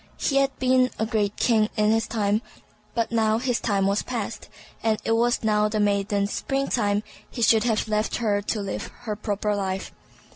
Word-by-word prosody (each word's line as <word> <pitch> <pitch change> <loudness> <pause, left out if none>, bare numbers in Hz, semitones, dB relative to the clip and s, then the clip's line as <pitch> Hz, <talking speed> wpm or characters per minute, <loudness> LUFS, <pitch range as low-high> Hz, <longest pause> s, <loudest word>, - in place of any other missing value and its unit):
He 275 - 0
had 275 0 +2
been 255 0 +3
a 220 - 0
great 210 -3 0
king 220 -3 +2
in 210 0 +3
his 225 0 +1
time, 210 -1 0 0.5
but 230 -1 0
now 220 -1 +2
his 245 0 0
time 200 -4 +1
was 200 +1 +2
past, 230 -3 -5 0.3
and 220 -1 +2
as - - -13
it - - 0
was 235 +1 +2
now 210 -1 +2
the 215 0 -1
maiden's 200 0 +1
spring 275 0 -1
time, 205 -3 +1 0.3
he 235 - -3
should 220 0 +4
have 225 -1 +1
left 215 0 0
her 210 -4 0
to 210 +1 -2
live 200 - -4
her 220 -3 -3
proper 210 0 -1
life. 190 -1 -3
215 Hz, 195 wpm, -25 LUFS, 205-230 Hz, 0.5 s, should